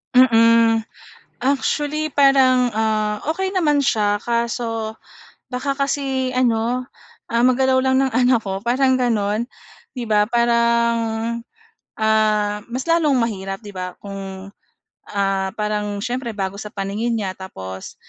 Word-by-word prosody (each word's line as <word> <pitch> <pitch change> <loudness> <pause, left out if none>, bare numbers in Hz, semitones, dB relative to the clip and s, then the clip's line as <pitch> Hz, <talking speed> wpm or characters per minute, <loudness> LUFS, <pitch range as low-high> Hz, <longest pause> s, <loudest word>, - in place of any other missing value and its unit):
Mm. 230 -2 +5 0.5
Actually, 295 +3 0
parang, 265 -3 +4
ah, 215 -1 0
okey 380 +3 -2
naman 300 -5 +2
siya 210 -5 +1
kaso 230 -1 -2 0.5
baka 275 +2 -2
kasi 270 -2 -1
ano, 250 0 0 0.4
ah, 235 +1 +1
magalaw 260 +1 +3
lang 260 0 +3
ng 270 - +2
anak 245 0 +3
ko, 195 -3 -4
parang 260 +2 +2
gano'n, 220 -3 0 0.5
'di 250 -3 -5
ba? 210 -1 +4
Parang, 235 0 +2 1.0
ah, 215 -1 +1
mas 260 +6 -4
lalong 310 -6 +3
mahirap, 195 -3 -3
'di 210 - -10
ba? 180 0 -4
Kung, 195 -1 -8 0.6
ah, 195 -1 -1
parang 210 -1 -2
siyempre, 240 0 -3
bago 195 -1 -3
sa 210 +1 -8
paningin 205 +4 -2
niya 195 -4 -3
tapos, 95 - -8
230 Hz, 125 wpm, -20 LUFS, 210-255 Hz, 1.0 s, Mm